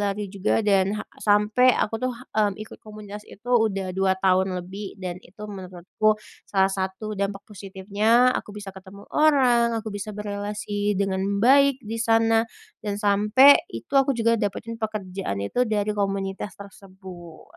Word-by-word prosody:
lari 205 Hz, 0 st, -2 dB
juga 200 Hz, +3 st, 0 dB
dan, 195 Hz, 0 st, +2 dB
ha -, -, -5 dB, 0.2 s
sampe 210 Hz, +5 st, +4 dB
aku 225 Hz, -, -1 dB
tuh, 255 Hz, -, +1 dB, 0.3 s
mmm, 210 Hz, -2 st, +2 dB
ikut 215 Hz, -, -10 dB
komunitas 210 Hz, -1 st, -10 dB
itu 220 Hz, +5 st, -13 dB
udah 200 Hz, -5 st, +1 dB
2 190 Hz, 0 st, +2 dB
tahun 190 Hz, -1 st, +2 dB
lebih. 195 Hz, +2 st, -8 dB
Dan 180 Hz, -1 st, -4 dB
itu 200 Hz, +4 st, -14 dB
menurutku, 190 Hz, +2 st, -1 dB, 0.3 s
salah 195 Hz, -1 st, +2 dB
satu 190 Hz, +3 st, -4 dB
dampak 200 Hz, 0 st, -2 dB
positifnya, 205 Hz, +5 st, +1 dB
aku -, -, -6 dB
bisa 200 Hz, -2 st, -7 dB
ketemu 190 Hz, +1 st, -12 dB
orang, 250 Hz, -6 st, +3 dB
aku 220 Hz, 0 st, -6 dB
bisa 205 Hz, +1 st, -5 dB
berelasi 205 Hz, 0 st, -3 dB
dengan 190 Hz, -1 st, 0 dB, 0.2 s
baik 275 Hz, +2 st, +5 dB
di 220 Hz, +2 st, -5 dB
sana, 225 Hz, 0 st, +3 dB, 0.4 s
dan 205 Hz, -1 st, -2 dB
sampe 210 Hz, +7 st, +6 dB
itu 115 Hz, 0 st, -9 dB
aku 270 Hz, 0 st, +3 dB
juga 230 Hz, 0 st, +3 dB
dapetin 220 Hz, +3 st, -3 dB
pekerjaan 195 Hz, -, -4 dB
itu 250 Hz, -, 0 dB
dari 210 Hz, -1 st, 0 dB
komunitas 195 Hz, -1 st, -3 dB
tersebut. 190 Hz, -4 st, -13 dB
205 Hz, 150 wpm, -24 LUFS, 195-220 Hz, 0.4 s, sampe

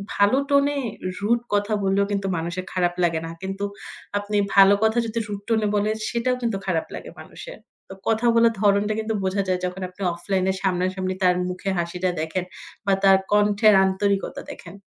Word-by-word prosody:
ভালো 205 Hz, +6 st, +4 dB
টোনে 285 Hz, 0 st, +3 dB, 0.4 s
রুড 230 Hz, +4 st, +2 dB
কথা 205 Hz, +1 st, +1 dB
বললেও 195 Hz, +1 st, +2 dB
কিন্তু 200 Hz, -1 st, -1 dB
মানুষের 170 Hz, +3 st, -4 dB
খারাপ 175 Hz, -1 st, +1 dB
লাগে 165 Hz, -2 st, +1 dB
না। 165 Hz, -, -6 dB
কিন্তু 195 Hz, +1 st, -4 dB, 0.6 s
আপনি 205 Hz, 0 st, -2 dB, 0.2 s
ভালো 195 Hz, 0 st, +8 dB
কথা 220 Hz, +2 st, +2 dB
যদি 230 Hz, +1 st, -2 dB
রুড 205 Hz, -1 st, -5 dB
টোনে 220 Hz, -2 st, +2 dB
বলে 205 Hz, +1 st, +1 dB, 0.2 s
সেটাও 245 Hz, +2 st, 0 dB
কিন্তু 230 Hz, -5 st, -1 dB
খারাপ 165 Hz, -4 st, 0 dB
লাগে -, -, -8 dB
মানুষের। -, -, -10 dB, 0.3 s
তো -, -, -7 dB
কথা 225 Hz, +1 st, +1 dB
বলার 230 Hz, 0 st, +5 dB
ধরণটা 205 Hz, +1 st, +3 dB
কিন্তু 220 Hz, 0 st, -2 dB
বোঝা 190 Hz, +1 st, 0 dB
যায়। 185 Hz, -1 st, 0 dB
যখন 180 Hz, +1 st, -5 dB
আপনি 185 Hz, +2 st, -16 dB
অফলাইন 185 Hz, +2 st, -1 dB, 0.2 s
সামনাসামনি 185 Hz, 0 st, -1 dB
তার 180 Hz, -1 st, +4 dB
মুখে 185 Hz, +2 st, -4 dB
হাসিটা 180 Hz, +2 st, -1 dB
দেখেন 175 Hz, +3 st, -3 dB, 0.4 s
বা 195 Hz, -, +3 dB
তার 195 Hz, -1 st, +7 dB
কণ্ঠের 210 Hz, +1 st, +4 dB
আন্তরিকতা 195 Hz, +1 st, -1 dB
দেখেন। -, -, -11 dB
200 Hz, 175 wpm, -23 LUFS, 185-215 Hz, 0.6 s, ভালো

